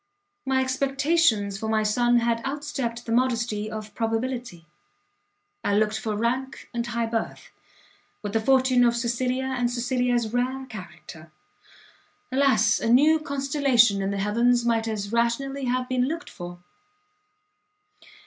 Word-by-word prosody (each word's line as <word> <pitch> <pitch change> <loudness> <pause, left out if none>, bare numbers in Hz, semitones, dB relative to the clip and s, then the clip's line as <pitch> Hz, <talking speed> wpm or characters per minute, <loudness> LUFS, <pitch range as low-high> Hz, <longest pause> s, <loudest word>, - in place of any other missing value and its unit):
My 265 0 +2
expectations 260 -5 +1
for 220 -1 -3
my 220 -1 +2
son 240 +3 +2
had 230 0 0
"outstepped 270 -4 -4
the 230 - -5
modesty 235 -3 0
of" 215 -1 -7
probability. 225 -5 -3 1.0
I 200 - +1
looked 215 +1 +1
for 215 -1 -3
rank 255 +4 -2
and 235 0 -2
high 235 0 -1
birth, 225 0 -4 0.7
with 205 -1 -4
the 225 - +2
fortune 260 0 +3
of 235 -1 +3
Cecilia, 250 +2 -1
and 245 -1 0
Cecilia's 245 -2 0
rare 260 +2 -1
character. 175 -7 -11 1.0
Alas! 255 -5 +3
a 230 - -1
new 300 +6 +5
constellation 275 -7 +2
in 195 - -1
the 200 - -2
heavens 235 +4 +2
might 230 -1 +1
as 205 -2 -3
rationally 260 +4 0
have 250 0 -1
been 255 0 +1
looked 330 +4 -5
for! 175 -1 -9
240 Hz, 135 wpm, -25 LUFS, 220-260 Hz, 1.0 s, new